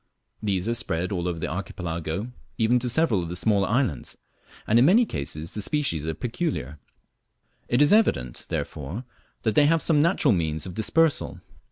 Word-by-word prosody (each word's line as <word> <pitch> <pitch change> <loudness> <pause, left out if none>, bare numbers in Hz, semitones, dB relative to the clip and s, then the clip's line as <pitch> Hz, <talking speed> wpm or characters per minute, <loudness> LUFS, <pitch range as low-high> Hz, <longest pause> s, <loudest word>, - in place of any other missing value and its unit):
These 100 -2 -1
are 115 - +1
spread 90 -5 -1
all 90 -2 -2
over 85 -2 -2
the 80 - -3
Archipelago, 90 +2 -4 0.3
even 120 +1 +3
to 125 0 -2
several 120 - +2
of 85 - -5
the 90 - -4
smaller 100 +1 +2
islands, 115 - -1 0.5
and 115 +2 +4
in 125 - +6
many 220 +10 +5
cases 75 - -5
the 105 - -2
species 100 - -1
are 80 - -2
peculiar. 120 - -3 0.9
It 120 +4 +3
is 150 - +5
evident, 65 - +1
therefore, 80 - -4 0.4
that 110 - +1
they 145 +6 +5
have 165 +1 +2
some 155 -3 +3
natural 160 - +3
means 80 -4 -1
of 90 - -7
dispersal. 155 - +1
105 Hz, 175 wpm, -25 LUFS, 85-140 Hz, 0.9 s, in